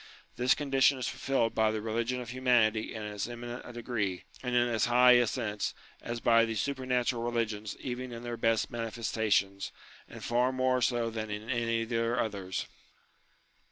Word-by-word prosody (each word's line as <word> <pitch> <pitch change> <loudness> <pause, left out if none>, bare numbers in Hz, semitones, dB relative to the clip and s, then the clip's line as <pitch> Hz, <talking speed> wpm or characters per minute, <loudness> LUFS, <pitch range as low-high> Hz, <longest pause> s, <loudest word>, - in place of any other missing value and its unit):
This 125 +1 +3
condition 135 -1 +3
is 130 - -2
fulfilled 120 -4 0
by 110 -1 +3
the 110 - -1
Eeligion 115 +3 -1
of 120 - -8
Humanity 120 -4 +2
in 110 -2 -6
as 105 +2 -4
eminent 120 0 -6
a - - -8
degree, 115 -6 -3 0.2
and 125 -1 -2
in 120 0 +4
as 115 -3 +1
high 125 +1 +6
a 120 -1 +6
sense, 105 -4 -2 0.3
as 120 0 -4
by 115 0 +5
the 115 -1 -1
supernatural 125 0 0
religions 115 -3 -2
even 125 0 -5
in 120 0 -7
their 120 -1 -4
best 115 -1 +1
manifesta 115 -1 -2
tions, 100 0 +1 0.4
and - - -10
far 125 +2 +2
more 130 -1 +1
so 120 -1 +1
than 110 -1 -4
in 105 +3 -4
any 115 -2 0
of 115 - -8
their 115 +1 0
others. 100 -5 -2
115 Hz, 180 wpm, -30 LUFS, 110-125 Hz, 0.4 s, high